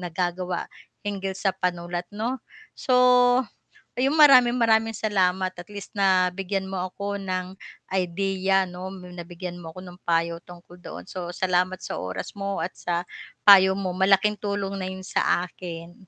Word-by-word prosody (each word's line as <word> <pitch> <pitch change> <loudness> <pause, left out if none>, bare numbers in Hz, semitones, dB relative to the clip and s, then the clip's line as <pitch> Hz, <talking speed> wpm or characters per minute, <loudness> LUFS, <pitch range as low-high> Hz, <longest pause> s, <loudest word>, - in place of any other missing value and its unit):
nagagawa 180 +1 -3 0.4
hinggil 195 -2 -3
sa 195 0 0
panulat 175 -1 -3
'no. 235 +5 -3 0.4
So, 255 - +1 1.1
ayun, 275 +5 +2
maraming 250 -5 +7
maraming 225 -1 +2
salamat 185 -3 +1
at 175 +1 -11
least 205 -2 -9
nabigyan 190 0 +1
mo 190 -1 -4
ako 200 +1 -4
ng 185 -1 -3 0.4
idea 190 +1 +1
'no, 180 +1 -7
nabigyan 180 -1 -8
mo 165 - -8
ako 185 - -8
ng 180 0 -12
payo 170 0 +1
tungkol 175 0 -15
doon. 90 - -8
So 175 - -6
salamat 185 +1 0
sa - - -4
oras 90 0 -5
mo 200 -1 -3
at - - -4
sa 175 0 -3 0.4
payo 190 -1 +8
mo 185 -2 -2
malaking 195 +2 +3
tulong 200 -1 -3
na 185 - -3
'yon 190 0 -8
sa 180 -1 +1
akin. 170 -1 -9
185 Hz, 150 wpm, -25 LUFS, 180-200 Hz, 1.1 s, payo